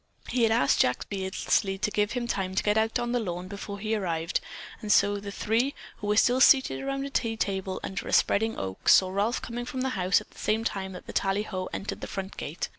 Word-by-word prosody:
He 250 - 0
had 225 -1 +4
asked 140 -11 +3
Jack 125 - +2
Beardsley 195 0 0
to 210 +2 -1
give 210 +1 0
him 245 -2 -2
time 190 -5 -2
to - - +1
get 210 0 +2
out 220 +2 +2
on 240 -1 -2
the 245 - +1
lawn 180 -4 -4
before 200 +1 -6
he 215 +2 -2
arrived, 170 -5 -1 0.4
and 210 - -2
so 205 +1 +4
the 200 0 -7
three, 230 +7 0 0.2
who 205 - -6
were 210 0 +2
still 250 +3 +4
seated 265 -1 +5
around 275 0 -2
a 280 - -6
tea 230 -4 -1
table 190 -2 -2
under 190 - -4
a - - -4
spreading 225 +2 +3
oak, 95 -1 -2
saw 185 -1 +6
Ralph 205 +5 0
coming 240 +1 -4
from 255 +1 -4
the 265 - 0
house 185 -6 +2
at 210 - -15
the - - -16
same 220 +1 0
time 190 -4 -3
that 180 - -9
the - - -8
tallyho 195 -1 -1
entered 200 - -5
the - - -5
front 195 0 -5
gate. 155 +5 -4
205 Hz, 240 wpm, -27 LUFS, 190-230 Hz, 0.4 s, saw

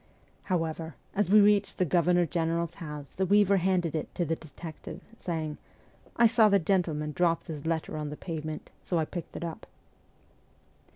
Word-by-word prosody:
However, 165 -4 -2 0.2
as 205 -1 +1
we 210 +2 +8
reached 205 0 +3
the 185 - +2
Governor 175 +2 +3
General's 165 0 -1
house 150 -3 -7
the 190 - 0
weaver 200 0 +5
handed 180 -3 +1
it 155 - -4
to 175 - 0
the 165 +1 0
detective, 160 0 -9 0.2
saying, 160 -7 -4 0.3
' - - -29
I 235 - +5
saw 225 -1 +6
the 200 - +5
gentleman 160 -5 0
drop 170 0 +1
this 155 -1 -6
letter 160 -1 -1
on 150 -1 -3
the 150 - -7
pavement, 155 -3 -5
so 175 - -1
I 160 - +2
picked 175 +1 -7
it - - -5
up.' 165 -2 -6
170 Hz, 175 wpm, -29 LUFS, 155-190 Hz, 0.3 s, we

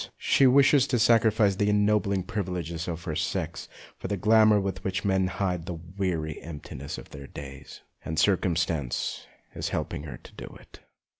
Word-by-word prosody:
She 135 - +4
wishes 135 +1 +5
to 125 - +1
sacrifice 110 -3 +4
the 105 0 +2
ennobling 105 -2 +2
privileges 90 -6 -4
of 85 -1 -4
her 80 - -3
sex 80 +1 -3 0.3
for - - -5
the 100 - -2
glamour 110 +1 +5
with 95 -1 -3
which 95 -2 -2
men 95 -1 +2
hide 90 -2 -2
the 90 - -3
weary 85 -2 -3
emptiness 75 -3 -7
of - - -11
their 70 -1 -9
days. 70 0 -10 0.2
And 80 - -4
circumstance 85 -6 0 0.3
is - - -3
helping - - -3
her 65 -6 -7
to - - -16
do - - -10
it. - - -17
95 Hz, 165 wpm, -27 LUFS, 80-105 Hz, 0.3 s, wishes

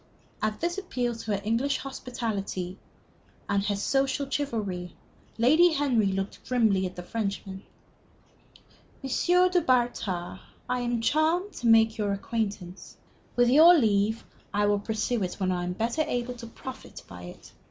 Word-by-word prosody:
At 215 0 -1
this 345 +3 -1
appeal 250 -11 -2
to 225 -2 -4
her 200 - -4
English 235 +6 +1
hospitality 210 -8 -4 0.7
and 200 -1 +1
her 205 - +1
social 270 +6 0
chivalry, 215 -11 -3 0.4
Lady 315 +9 +5
Henry 260 -8 +2
looked 195 +1 -3
grimly 215 -7 +2
at 185 - -10
the 180 - -7
Frenchman. 200 -2 -4 1.4
"M. 355 +7 +3
du 360 -1 +3
Bartas, 235 - 0 0.3
I 250 0 0
am 240 -1 -1
charmed 325 - +1
to 240 - -3
make 225 -1 +5
your 205 -1 0
acquaintance. 200 -3 -4 0.4
With 245 0 +4
your 325 +6 +8
leave, 215 -3 +1 0.3
I 205 0 +1
will 205 0 +2
pursue 220 +2 -1
it 180 -2 -2
when 185 -2 -1
I 180 -1 -1
am 180 - -2
better 230 - -1
able 245 -4 -2
to 235 -1 -9
profit 260 +3 -10
by 90 0 -10
it. 90 - -12
230 Hz, 150 wpm, -27 LUFS, 200-265 Hz, 1.4 s, your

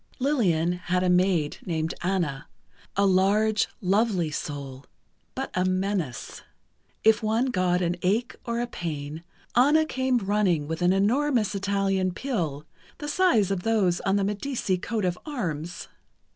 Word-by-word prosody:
Lillian 195 - +2 0.2
had 180 +1 +2
a 180 - +3
maid 180 -4 +2
named 160 -2 -2
Anna, 170 -6 -1 0.5
a 200 - +4
large, 205 +3 +3
lovely 190 -4 +1
soul, 140 -3 -5 0.5
but 270 +1 -4
a 180 - +1
menace. 185 -7 -2 0.6
If 220 +1 +5
one 225 +4 +1
got 180 -2 +1
an 175 0 0
ache 220 +7 0
or 235 0 -2
a 240 - 0
pain, 155 -6 -5 0.3
Anna 295 +6 +5
came 260 -3 0
running 195 -8 +1
with 160 +2 -4
an 175 +1 +4
enormous 225 +3 +2
Italian 195 -2 0
pill, 165 - -3 0.3
the 295 - -6
size 290 - +3
of 195 -2 -1
those 195 -5 +1
on 195 -1 +1
the 200 - +2
Medici 205 0 -1
coat 215 +1 -2
of 180 -1 -1
arms. 175 - -4
195 Hz, 145 wpm, -26 LUFS, 175-225 Hz, 0.6 s, If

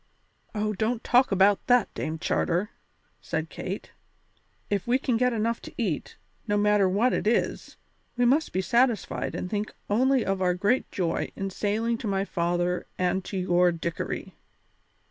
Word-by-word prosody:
"Oh, 215 0 0
don't 225 +4 -1
talk 250 0 +4
about 195 +1 +3
that, 245 -3 +3
Dame 160 0 -3
Charter," 175 +5 0 0.5
said - - -3
Kate; - - -6 0.8
"if 200 0 -1
we 245 +2 +4
can 260 -3 0
get 250 +2 +2
enough 230 0 -1
to - - -10
eat, 195 - -2 0.3
no 205 -1 +1
matter 205 -2 +3
what 220 +7 +2
it - - -1
is, 230 - 0 0.4
we 245 - +3
must 285 +7 +3
be 185 - 0
satisfied 240 +1 +1
and - - -3
think 210 +2 -3 0.2
only 260 +3 +3
of 195 -1 -1
our 180 -1 +2
great 210 +8 +1
joy 170 -3 -1
in 195 0 -3
sailing 225 +4 -1
to 225 - -4
my 195 -1 0
father 175 0 -1
and 185 +1 0
to 195 - -4
your 180 -1 +3
Dickory." 165 -1 -4
205 Hz, 165 wpm, -27 LUFS, 185-235 Hz, 0.8 s, talk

